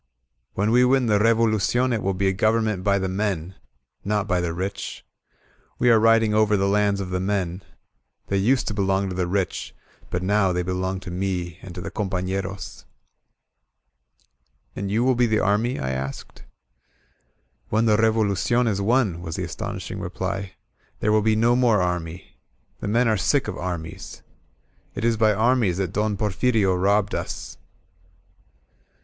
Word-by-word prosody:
When 105 +3 +1
we 125 +2 +5
win 130 0 +3
the 105 -3 +3
Revolucion 115 +2 +2
it 110 - -1
will 95 0 -1
be 95 +1 0
a 95 - +2
government 110 -1 +1
by 100 0 +2
the 95 -1 -1
men, 95 -3 -2 0.5
—not 105 0 -1
by 90 -3 +1
the 85 -1 -2
rich. 95 +4 -5 0.7
We 120 0 +4
are 115 - +6
riding 115 -1 +4
over 105 -1 +3
the 100 0 +1
lands 100 0 +2
of 95 -2 -5
the 90 - -1
men. 95 -2 -2 0.6
They 100 - -1
used 125 +6 +2
to - - -3
belong 95 -1 0
to 90 - -5
the 90 -1 -1
rich, 95 +1 -2 0.3
but 90 +1 -2
now 100 0 +2
they 90 0 -1
belong 95 +1 -2
to 90 -2 -8
me 90 -2 -3
and 90 -2 -10
to 90 - -6
the 100 - -6
compafleroM 95 0 -4 1.9
"And 100 0 -4
you 110 +4 +1
will 130 +1 +3
be 120 0 +2
the 110 -1 +1
army?" 110 +5 +1
I 65 - -2
asked. 65 +1 -6 1.3
^^When 110 +2 +2
the 110 -2 +4
Revolucion 110 +2 +2
is 100 -3 0
won," 105 -5 +1
was 80 -2 -5
the - - -3
astonishing - - -5
reply, 95 +1 -4 0.5
"there 105 - +1
will 110 0 +4
be 110 +1 +2
no 115 +2 +3
more 120 -4 +3
army. 90 -1 -3 0.4
The - - -4
men 115 +4 +2
are 110 -1 +2
sick - - +1
of - - -4
armies* 85 -3 -6 0.7
It - - -2
is 115 -1 +3
by 110 -1 +3
armies 110 -4 +2
that 95 -2 -2
Don 105 0 0
Porfirio 105 0 +1
robbed 100 +3 +1
us." - - -5
100 Hz, 165 wpm, -23 LUFS, 95-110 Hz, 1.9 s, are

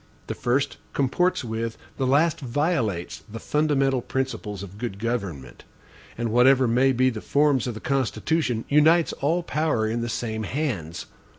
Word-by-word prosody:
The - - -4
first 130 +3 0 0.2
comports 160 +7 +1
with, 115 0 -3 0.2
the 130 - 0
last 150 +5 +3
violates, 125 - -1
the 115 - -6
fundamental 135 -3 +1
principles 125 -6 -3
of 100 +1 -10
good 115 -5 -4
government; 100 - -4 0.5
and, 120 -1 -2
whatever 130 +2 +5
may 125 +3 +3
be 130 0 +2
the 110 -2 -6
forms 140 -4 +2
of 120 - -3
the - - -6
Constitution, 135 -1 0
unites 160 +3 +4
all 165 +5 0
power 150 -9 0
in 115 +2 -1
the 120 - -3
same 110 -1 -3
hands. 105 - -3
125 Hz, 155 wpm, -25 LUFS, 110-145 Hz, 0.5 s, whatever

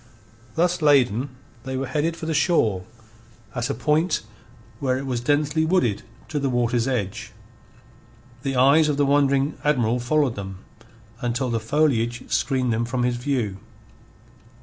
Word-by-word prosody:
Thus 175 +1 +1
laden, 135 -4 +3 0.3
they 130 0 -4
were 135 - -2
headed 160 +4 -1
for 160 - -6
the 160 - -1
shore, 115 - +2 0.7
at 125 0 -2
a 140 - -1
point 155 +1 +1 0.6
where 130 -2 0
it 135 - -5
was 125 -3 -2
densely 145 +4 +1
wooded 160 - +1 0.3
to 150 - -1
the 140 -1 0
water's 120 -1 +1
edge. 110 -8 -3 1.1
The 135 0 -2
eyes 140 +5 +5
of 145 - 0
the 145 - +3
wondering 140 0 +2
Admiral 125 -5 +2
followed 135 +1 +1
them 95 -2 -8 0.6
until 120 +1 -1
the 115 - 0
foliage 120 -1 +1
screened 130 -3 +1
them 115 +1 0
from 120 +1 -2
his 120 0 0
view. 120 -7 -1
130 Hz, 150 wpm, -23 LUFS, 120-150 Hz, 1.1 s, eyes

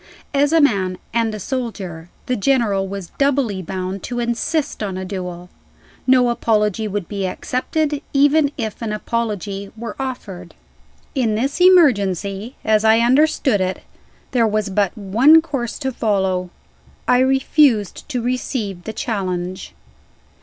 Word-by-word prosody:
As 285 +1 +3
a 330 - +5
man 195 -10 +2 0.2
and 225 -2 0
a - - -6
soldier, 195 - -5 0.2
the 255 - 0
General 210 -5 +1
was 195 -2 -7
doubly 270 -8 +1
bound 185 +1 -4
to 245 -1 -4
insist 240 +6 -1
on 195 -3 -3
a 190 - -4
duel. 180 -2 -6 0.6
No 255 -1 +5
apology 215 -2 +1
would 205 -3 -3
be 200 -2 -2
accepted, 290 +8 -2
even 285 +1 +4
if 220 -4 -4
an 220 -2 -2
apology 210 -3 -3
were 230 +5 -6
offered. 200 -10 -6 0.6
In 235 -6 +1
this 275 +9 -1
emergency, 210 - +3
as 215 -1 +3
I 220 0 +5
understood 255 -2 +3
it, 185 0 -2 0.5
there 235 -3 +3
was 215 -1 -1
but 200 +2 0
one 235 +11 +5
course 275 -7 -4
to 265 -2 -2
follow. 190 -6 0 0.6
I 250 - +4
refused 265 -4 +2
to 250 -5 -2
receive 235 -7 -3
the 220 - -5
challenge. 185 -5 -3
220 Hz, 140 wpm, -20 LUFS, 195-260 Hz, 0.6 s, a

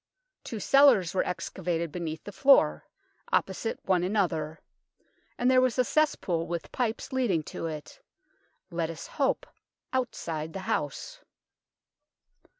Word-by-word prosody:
Two 225 - -5
cellars 275 - +5
were 190 - +2
excavated 170 -2 -2
beneath 160 -1 -5
the 205 - -8
floor, 195 - +4 0.4
opposite 195 +4 0
one 185 -2 +2
another, 170 -6 0 0.8
and 250 +1 +3
there 255 0 +6
was 255 -1 +1
a 255 - +5
cesspool 225 - +1
with 170 0 -4
pipes 245 +2 -2
leading 220 -12 +1
to 165 - -5
it 155 -2 -8 0.7
let 165 -1 -1
us 165 0 -7
hope 275 -2 0 0.5
outside 165 -11 -2
the 195 - -5
house. - - -3
185 Hz, 125 wpm, -28 LUFS, 165-250 Hz, 0.8 s, there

